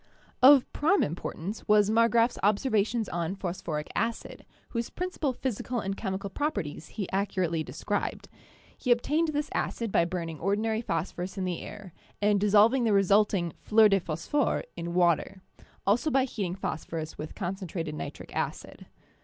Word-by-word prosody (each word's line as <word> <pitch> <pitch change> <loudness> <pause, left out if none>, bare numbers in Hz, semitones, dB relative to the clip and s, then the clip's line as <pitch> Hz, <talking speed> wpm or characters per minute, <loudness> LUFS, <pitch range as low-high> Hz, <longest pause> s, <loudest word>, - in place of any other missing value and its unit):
Of 265 0 +8
prime 335 +7 +3
importance 175 +5 -5
was 210 0 +5
Marggrafs 230 +1 +3
observations 215 +1 +1
on 170 +2 -2
phosphoric 170 -5 -4
acid, 230 0 -3 0.2
whose 235 -1 -3
principal 360 -6 -2
physical 250 -1 -3
and 195 -1 -3
chemical 195 -1 -4
properties 195 - -3
he 200 -4 -2
accurately 185 -4 0
described. - - -3 0.5
He 250 - -5
obtained 300 +7 +2
this 295 -1 -2
acid 230 -3 -2
by 170 - +3
burning 170 -3 -4
ordinary 215 +4 0
phosphorus 175 0 -3
in 190 - -1
the 180 -2 -3
air, 200 -5 -9 0.3
and 205 0 +3
dissolving 210 +5 +5
the 220 -3 +3
resulting 195 -3 +3
"fleurs 220 0 +5
de 195 - +4
phosphore" 175 - -1
in 170 0 -5
water; 180 +2 +2 0.4
also 230 +10 +2
by 270 -2 +3
heating 200 -8 -3
phosphorus 160 -3 -5
with 155 - -6
concentrated 180 -4 -4
nitric - - -7
acid. - - -4
200 Hz, 145 wpm, -28 LUFS, 175-230 Hz, 0.5 s, Of